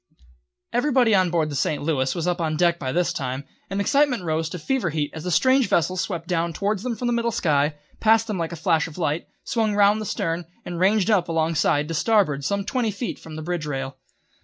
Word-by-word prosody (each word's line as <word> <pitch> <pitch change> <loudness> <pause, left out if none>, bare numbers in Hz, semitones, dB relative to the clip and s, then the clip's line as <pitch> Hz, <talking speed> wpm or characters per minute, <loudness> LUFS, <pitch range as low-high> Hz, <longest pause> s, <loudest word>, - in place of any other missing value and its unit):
Everybody 245 -2 +3
on 185 -2 +4
board 160 -3 0
the - - -4
St. 145 +2 -1
Louis 135 -4 0
was 170 -2 -2
up 180 0 0
on 155 -1 -1
deck 170 0 +2
by 130 -2 -3
this 175 +4 +1
time, 130 0 -3 0.3
and 195 +1 -2
the - - +1
excitement 280 -5 +2
rose 160 -1 -1
to 180 - -5
fever 230 - -1
heat 150 -1 -2
as 160 +1 -7
the - - -1
strange 260 - +3
vessel 170 +2 +2
swept 175 -2 -3
down 170 -1 0
towards 200 +3 -1
them 245 0 -2
from 245 - -5
the 240 - +1
middle 235 0 +1
sky, 150 -7 +1 0.2
passed 225 0 +4
them 210 -5 -3
like 165 0 -2
a - - -5
flash 160 0 +1
of 160 - -11
light, 160 -2 -1 0.2
swung 220 -3 0
round 205 +1 +4
the 215 - -4
stern, 165 0 -2 0.2
and 175 -1 -5
ranged 205 +3 +3
up 185 -5 +2
alongside 160 -2 +1
to 165 - -4
starboard 165 -7 +2
some 200 +6 -1
twenty 240 0 0
feet 215 +4 -4
from 160 -1 -10
the 155 - -6
bridge 170 -2 -3
rail. 135 -1 -4
175 Hz, 235 wpm, -23 LUFS, 155-215 Hz, 0.3 s, on